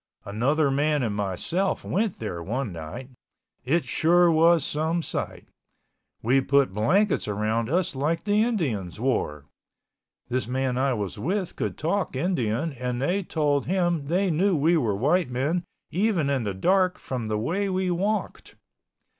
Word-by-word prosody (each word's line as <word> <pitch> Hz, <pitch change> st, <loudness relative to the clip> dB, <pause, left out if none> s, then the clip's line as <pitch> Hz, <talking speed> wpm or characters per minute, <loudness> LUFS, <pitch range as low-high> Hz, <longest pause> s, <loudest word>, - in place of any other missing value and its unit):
Another 135 Hz, +8 st, +1 dB
man 145 Hz, 0 st, +1 dB
and 105 Hz, -3 st, -1 dB
myself 105 Hz, -, -1 dB
went 210 Hz, 0 st, -1 dB
there 90 Hz, -6 st, -5 dB
one 115 Hz, +5 st, -3 dB
night. 85 Hz, -, -8 dB, 0.5 s
It 150 Hz, +3 st, +1 dB
sure 170 Hz, +5 st, +4 dB
was 165 Hz, -1 st, +4 dB
some 160 Hz, +3 st, -1 dB
sight. -, -, -5 dB, 0.8 s
We 130 Hz, +4 st, +3 dB
put 140 Hz, -4 st, +2 dB
blankets 185 Hz, -, +2 dB
around 110 Hz, +3 st, -1 dB
us 180 Hz, 0 st, 0 dB
like 150 Hz, +5 st, -1 dB
the 210 Hz, 0 st, +2 dB
Indians 135 Hz, -, -1 dB
wore. 90 Hz, -, -1 dB, 0.8 s
This 125 Hz, -1 st, -2 dB
man 130 Hz, 0 st, -1 dB
I 130 Hz, 0 st, +1 dB
was 100 Hz, -4 st, -4 dB
with 185 Hz, +2 st, -2 dB
could -, -, -3 dB
talk 175 Hz, -1 st, -1 dB
Indian 140 Hz, -, 0 dB
and 125 Hz, -1 st, -3 dB
they 175 Hz, +9 st, 0 dB
told 145 Hz, -6 st, 0 dB
him 175 Hz, -5 st, 0 dB
they 185 Hz, +4 st, +1 dB
knew 185 Hz, +4 st, +2 dB
we 160 Hz, +4 st, +3 dB
were 115 Hz, -10 st, +1 dB
white 150 Hz, -, +2 dB
men 145 Hz, +8 st, -1 dB, 0.3 s
even 180 Hz, -6 st, +1 dB
in 130 Hz, -5 st, 0 dB
the 100 Hz, -2 st, -2 dB
dark 185 Hz, -, +2 dB
from 125 Hz, -4 st, -4 dB
the 110 Hz, 0 st, -1 dB
way 185 Hz, -, -1 dB
we 185 Hz, -1 st, 0 dB
walked. 200 Hz, +5 st, -2 dB
145 Hz, 155 wpm, -25 LUFS, 120-175 Hz, 0.8 s, sure